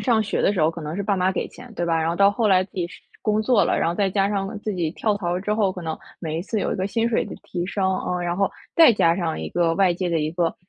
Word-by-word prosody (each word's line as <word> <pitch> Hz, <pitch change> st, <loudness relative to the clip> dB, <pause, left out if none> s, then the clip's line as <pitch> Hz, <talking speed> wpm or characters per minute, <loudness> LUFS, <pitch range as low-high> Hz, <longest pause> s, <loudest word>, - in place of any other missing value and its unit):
上 230 Hz, -4 st, +2 dB
学 215 Hz, -, -1 dB
的 -, -, +3 dB
时 190 Hz, -, -1 dB
候， 155 Hz, +1 st, +4 dB
可 165 Hz, 0 st, -8 dB
能 150 Hz, +1 st, -5 dB
是 200 Hz, -, -2 dB
爸 200 Hz, 0 st, 0 dB
妈 185 Hz, +1 st, +2 dB
给 -, -, -3 dB
钱， 245 Hz, -, -13 dB
对 175 Hz, -, -2 dB
吧？ 165 Hz, -1 st, +1 dB
然 160 Hz, -, 0 dB
后 -, -, -1 dB
到 200 Hz, +1 st, +5 dB
后 220 Hz, +2 st, 0 dB
来 185 Hz, -2 st, +5 dB
自 185 Hz, -, -12 dB
己 175 Hz, -2 st, -2 dB
是 -, -, -14 dB, 0.2 s
工 215 Hz, 0 st, +1 dB
作 220 Hz, -1 st, +3 dB
了， -, -, +1 dB
然 -, -, +1 dB
后 170 Hz, -, -1 dB
再 195 Hz, +1 st, +1 dB
加 195 Hz, +1 st, +1 dB
上 200 Hz, -1 st, -1 dB
自 210 Hz, -2 st, -3 dB
己 170 Hz, -3 st, -1 dB
跳 210 Hz, +4 st, 0 dB
槽 175 Hz, -4 st, -2 dB
了 180 Hz, -, -1 dB
之 210 Hz, +2 st, -1 dB
后， 205 Hz, -3 st, +1 dB
可 180 Hz, -, -7 dB
能 160 Hz, -1 st, -4 dB, 0.2 s
每 160 Hz, -2 st, -3 dB
一 170 Hz, -, -3 dB
次 215 Hz, +1 st, -2 dB
有 -, -, -1 dB
一 -, -, -3 dB
个 190 Hz, 0 st, -1 dB
薪 230 Hz, +2 st, 0 dB
水 235 Hz, -, +1 dB
的 -, -, -8 dB
提 175 Hz, -1 st, -4 dB
升， 190 Hz, 0 st, -1 dB
呃， 180 Hz, 0 st, -2 dB
然 175 Hz, 0 st, -1 dB
后 195 Hz, -1 st, +1 dB, 0.3 s
再 325 Hz, -8 st, +8 dB
加 170 Hz, -5 st, +3 dB
上 170 Hz, -4 st, -2 dB
一 -, -, -4 dB
个 170 Hz, -1 st, +1 dB
外 185 Hz, -1 st, +3 dB
界 180 Hz, 0 st, -2 dB
的 165 Hz, -, +1 dB
一 150 Hz, +1 st, -1 dB
个 170 Hz, -1 st, 0 dB
185 Hz, 355 characters per minute, -23 LUFS, 170-205 Hz, 0.3 s, 再